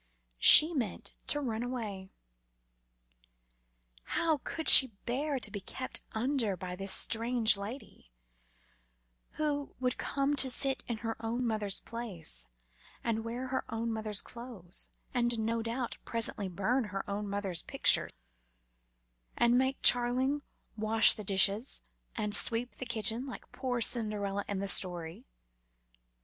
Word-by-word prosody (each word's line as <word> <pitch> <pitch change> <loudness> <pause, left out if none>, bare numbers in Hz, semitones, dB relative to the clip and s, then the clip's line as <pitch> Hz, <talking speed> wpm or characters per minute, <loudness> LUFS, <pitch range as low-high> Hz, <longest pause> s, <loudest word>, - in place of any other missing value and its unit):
She 310 - +9
meant 240 - -5
to 290 - 0
run 230 -5 -5
away. 215 -6 -7 2.1
How 320 -3 -1
could 320 -3 -7
she 260 - +11 0.2
bear 275 +4 -3
to 250 - -5
be 205 - -6
"kept 255 +6 -5
under" 225 -4 -3
by 180 0 -7
this 195 +1 -2
strange 230 -1 +3
lady, 200 - -9 1.2
who 290 -2 -2
would 250 -1 -3
come 275 0 -3
and 290 - 0
sit 265 +1 +3
in 235 - -5
her 225 - -4
own 235 +3 -4
mother's 215 -3 -1
place, 180 - -5 0.6
and 225 -1 -3
wear 245 +3 -7
her 260 - -3
own 225 0 -4
mother's 215 -2 -1
clothes, 235 -8 -6 0.2
and 240 -1 -1
no 225 +1 -3
doubt 235 +2 -6
presently 225 -4 -1
burn 220 +8 -2
her 195 -1 -7
own 205 0 -6
mother's 195 -4 -4
picture, - - +1 1.3
and 240 0 +2
make 265 +2 -1
Charling 255 +4 +4 0.3
wash 220 +1 +5
the 215 - -7
dishes 200 +5 +1 0.3
and 210 -2 -2
sweep 235 +3 +2
the 255 - -7
kitchen 230 +2 -1
like 260 - -11
poor 255 -2 -5
dear - - -4
Cinderella 205 -4 -1
in 200 - -4
the 200 +1 -4
story? 175 -3 +3
230 Hz, 135 wpm, -29 LUFS, 205-255 Hz, 2.1 s, she